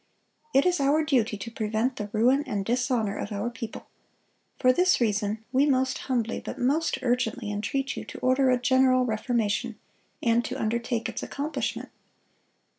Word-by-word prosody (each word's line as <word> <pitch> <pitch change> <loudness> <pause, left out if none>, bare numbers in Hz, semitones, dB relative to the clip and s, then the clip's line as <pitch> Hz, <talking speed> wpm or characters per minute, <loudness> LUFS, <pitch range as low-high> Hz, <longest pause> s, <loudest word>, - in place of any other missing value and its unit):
It 275 - +4
is 360 -1 +2
our 285 +3 +3
duty 240 -8 +1
to 230 +4 -7
prevent 225 +3 -1
the 210 -1 -4
ruin 250 +6 +3
and 200 -2 -2
dishonor 240 -3 0
of 205 - -4
our 205 +4 -2
people. 230 -1 -7 0.7
For 255 0 +4
this 360 +5 +3
reason 215 -1 0
we 275 +3 +3
most 260 -2 +1
humbly 235 -3 0
but - - -6
most 290 +6 +1
urgently 245 -2 0
entreat 225 +7 -2
you - - -5
to - - -9
order 260 +1 +2
a 250 - +4
general 255 0 +3
reformation, 220 -2 -1 0.5
and 235 0 +3
to 260 +2 -4
undertake 235 +1 -1
its 230 - -5
accomplishment." 290 +3 -3
245 Hz, 160 wpm, -27 LUFS, 220-265 Hz, 0.7 s, It